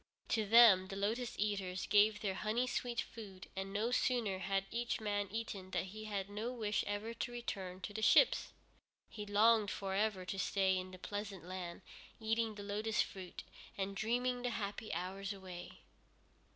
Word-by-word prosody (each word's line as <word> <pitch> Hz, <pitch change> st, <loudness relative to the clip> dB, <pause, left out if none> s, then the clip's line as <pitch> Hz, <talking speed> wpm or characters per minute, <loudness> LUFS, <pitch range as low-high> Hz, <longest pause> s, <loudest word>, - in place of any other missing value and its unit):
To 220 Hz, -2 st, +1 dB
them 215 Hz, -4 st, +8 dB
the 195 Hz, -, -6 dB
Lotus 225 Hz, +5 st, -1 dB
Eaters 195 Hz, -3 st, -1 dB
gave 210 Hz, 0 st, +4 dB
their 195 Hz, -3 st, 0 dB
honey 215 Hz, +5 st, 0 dB
sweet 245 Hz, -1 st, -1 dB
food, 200 Hz, -7 st, -9 dB
and 195 Hz, 0 st, -3 dB
no 215 Hz, +4 st, 0 dB
sooner 235 Hz, -6 st, +1 dB
had 195 Hz, 0 st, 0 dB
each 235 Hz, 0 st, -1 dB
man 205 Hz, -2 st, -1 dB
eaten 205 Hz, -3 st, -4 dB
than 190 Hz, -, -1 dB
he 215 Hz, +3 st, -8 dB
had 200 Hz, -2 st, -2 dB
no 210 Hz, +4 st, -3 dB
wish 215 Hz, -4 st, 0 dB
ever 205 Hz, +3 st, -2 dB
to 235 Hz, -, -3 dB
return 190 Hz, -6 st, -5 dB
to 205 Hz, -, -5 dB
the 220 Hz, -, -3 dB
ships. 460 Hz, -, +5 dB, 0.6 s
He 210 Hz, -1 st, -6 dB
longed 215 Hz, +1 st, +5 dB
for 195 Hz, -2 st, -3 dB
ever 200 Hz, -2 st, +1 dB
to 190 Hz, +1 st, -3 dB
stay 190 Hz, 0 st, +2 dB
in 185 Hz, 0 st, -3 dB
that 185 Hz, -1 st, -12 dB
pleasant 205 Hz, -3 st, -5 dB
land, 180 Hz, -1 st, -6 dB, 0.4 s
eating 225 Hz, 0 st, 0 dB
the 205 Hz, -, -7 dB
lotus 210 Hz, +2 st, +1 dB
fruit, 185 Hz, -2 st, -8 dB, 0.3 s
and 195 Hz, 0 st, -2 dB
dreaming 245 Hz, +4 st, 0 dB
the 245 Hz, -, 0 dB
happy 210 Hz, -1 st, -4 dB
hours 190 Hz, +4 st, -3 dB
away. 185 Hz, -3 st, -9 dB
205 Hz, 175 wpm, -36 LUFS, 190-225 Hz, 0.6 s, them